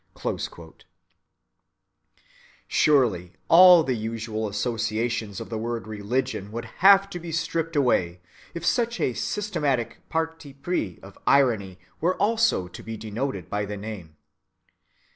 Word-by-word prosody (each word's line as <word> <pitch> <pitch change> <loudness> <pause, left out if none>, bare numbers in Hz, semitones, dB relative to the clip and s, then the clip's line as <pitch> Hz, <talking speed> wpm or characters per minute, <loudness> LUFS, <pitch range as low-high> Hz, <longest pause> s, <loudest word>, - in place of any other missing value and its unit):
(12) - - -3 2.3
Surely 115 - +2 0.2
all 180 -1 +9
the 130 - 0
usual 110 -1 -3
associations 110 0 -2
of - - -8
the 110 - -2
word 115 0 -3
"religion" 105 -1 -3
would 115 +1 -5 0.2
have 195 +1 +7
to 180 -3 -7
be 170 -1 -7
stripped 165 0 -2
away 90 -11 +1 0.4
if 170 0 -5
such 235 +4 +1
a 125 - 0
systematic 140 - -2
parti 160 -3 -3
pris 135 - -3
of 95 0 -13
irony 110 -10 +3 0.2
were 180 +3 +1
also 220 - +2
to 90 - -11
be 115 0 -7
denoted 110 - -4
by 105 0 -2
the 105 0 -5
name. 100 -7 -8
120 Hz, 125 wpm, -25 LUFS, 105-165 Hz, 2.3 s, all